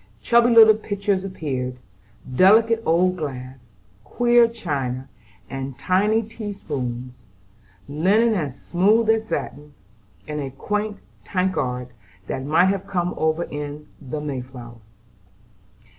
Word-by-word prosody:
Chubby 235 Hz, -, +4 dB
little 225 Hz, -2 st, +8 dB
pitchers 200 Hz, -2 st, -2 dB
appeared, 130 Hz, -9 st, -4 dB, 0.6 s
delicate 225 Hz, -, +5 dB
old 180 Hz, +3 st, +3 dB
glass, 130 Hz, -4 st, -6 dB, 0.4 s
queer 240 Hz, -, +4 dB
china, 140 Hz, -, -4 dB, 0.4 s
and 135 Hz, -1 st, -6 dB
tiny 205 Hz, +9 st, +2 dB
tea 215 Hz, -1 st, -7 dB
spoons; 125 Hz, -8 st, -5 dB, 0.7 s
linen 195 Hz, +11 st, +2 dB
as 145 Hz, -9 st, -3 dB
smooth 215 Hz, +5 st, +3 dB
as 220 Hz, 0 st, 0 dB
satin, 150 Hz, -7 st, -5 dB, 0.5 s
and 150 Hz, -1 st, -3 dB
a 135 Hz, -, -4 dB
quaint 210 Hz, +9 st, -3 dB, 0.3 s
tankard 150 Hz, -10 st, -1 dB, 0.4 s
that 130 Hz, -, -4 dB
might 155 Hz, +6 st, +3 dB
have 195 Hz, 0 st, -2 dB
come 180 Hz, -3 st, -1 dB
over 160 Hz, +2 st, 0 dB
in 145 Hz, 0 st, -6 dB, 0.2 s
the 145 Hz, +2 st, -5 dB
"May 145 Hz, -3 st, -4 dB
flower." 120 Hz, -2 st, -11 dB
165 Hz, 115 wpm, -22 LUFS, 135-210 Hz, 0.7 s, little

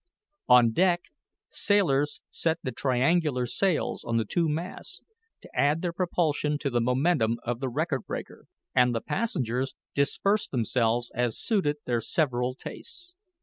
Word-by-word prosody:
On 125 Hz, -2 st, +7 dB
deck, 175 Hz, +5 st, +3 dB, 0.5 s
sailors 150 Hz, -9 st, +1 dB
set 160 Hz, -1 st, 0 dB
the 130 Hz, -, -2 dB
triangular 130 Hz, +2 st, +1 dB
sails 180 Hz, -, 0 dB
on 115 Hz, -, -1 dB
the 115 Hz, -, +1 dB
two 165 Hz, +9 st, 0 dB
masts, 175 Hz, -, -5 dB, 0.4 s
to -, -, -14 dB
add 150 Hz, +4 st, +2 dB
their 175 Hz, -1 st, -1 dB
propulsion 160 Hz, -4 st, 0 dB
to 145 Hz, -2 st, -2 dB
the 120 Hz, -1 st, +1 dB
momentum 125 Hz, -1 st, +2 dB
of 120 Hz, 0 st, -2 dB
the 135 Hz, -1 st, -2 dB
record 155 Hz, +7 st, -2 dB
breaker, -, -, -6 dB, 0.3 s
and 125 Hz, -1 st, +4 dB
the 115 Hz, -, -1 dB
passengers 135 Hz, -, -1 dB, 0.2 s
dispersed 200 Hz, +9 st, +1 dB
themselves 120 Hz, -1 st, 0 dB
as 120 Hz, -2 st, 0 dB
suited 185 Hz, -10 st, 0 dB
their 120 Hz, -2 st, 0 dB
several 125 Hz, -3 st, 0 dB
tastes. 350 Hz, -, -8 dB
140 Hz, 145 wpm, -27 LUFS, 125-170 Hz, 0.5 s, On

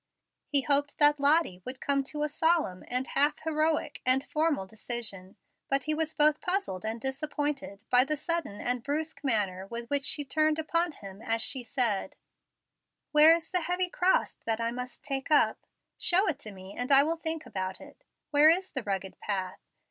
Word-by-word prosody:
He 285 Hz, -1 st, +3 dB
hoped 285 Hz, +1 st, +1 dB
that 295 Hz, -1 st, +5 dB
Lottie 285 Hz, -, +3 dB
would 255 Hz, 0 st, -7 dB
come 280 Hz, -1 st, 0 dB
to 295 Hz, +2 st, -3 dB
a -, -, +1 dB
solemn 300 Hz, -, +1 dB
and 250 Hz, +1 st, -2 dB
half 290 Hz, +2 st, +2 dB
heroic 310 Hz, 0 st, 0 dB
and 260 Hz, +1 st, +2 dB
formal 305 Hz, -9 st, 0 dB
decision. 210 Hz, -3 st, -5 dB, 0.3 s
But 275 Hz, -1 st, +1 dB
he 305 Hz, -, -1 dB
was 315 Hz, 0 st, -2 dB
both 300 Hz, 0 st, +3 dB
puzzled 360 Hz, -, -2 dB
and 220 Hz, +1 st, -3 dB
disappointed 275 Hz, -4 st, -4 dB
by 250 Hz, +1 st, +6 dB
the 305 Hz, +2 st, -2 dB
sudden 335 Hz, -, -3 dB
and 245 Hz, 0 st, -1 dB
brusque 310 Hz, +5 st, -3 dB
manner 195 Hz, -7 st, 0 dB
with 235 Hz, +2 st, -6 dB
which 285 Hz, -1 st, 0 dB
she 290 Hz, +2 st, -1 dB
turned 310 Hz, +2 st, +1 dB
upon 335 Hz, +1 st, 0 dB
him 195 Hz, -4 st, -11 dB
as 225 Hz, 0 st, 0 dB
she 260 Hz, -3 st, -1 dB
said: 245 Hz, 0 st, -1 dB, 1.0 s
"Where 305 Hz, +2 st, +8 dB
is 335 Hz, -, -7 dB
the 365 Hz, -1 st, +1 dB
heavy 360 Hz, +1 st, -1 dB
cross 365 Hz, +1 st, +2 dB
that 225 Hz, 0 st, 0 dB
I 230 Hz, 0 st, -1 dB
must 250 Hz, +1 st, -7 dB
take 270 Hz, -1 st, -4 dB
up? 300 Hz, -, +2 dB, 0.3 s
Show 375 Hz, +4 st, +3 dB
it 290 Hz, -3 st, -1 dB
to 215 Hz, -, -8 dB
me, 190 Hz, 0 st, -11 dB
and 245 Hz, +2 st, -3 dB
I 275 Hz, 0 st, +8 dB
will 325 Hz, +3 st, -1 dB
think 320 Hz, -1 st, -4 dB
about 190 Hz, -1 st, -4 dB
it. -, -, -15 dB, 0.3 s
Where 295 Hz, +1 st, +7 dB
is 370 Hz, +3 st, +1 dB
the 265 Hz, -, -2 dB
rugged 195 Hz, -3 st, -4 dB
path? 190 Hz, -3 st, -3 dB
280 Hz, 185 wpm, -29 LUFS, 230-310 Hz, 1.0 s, Where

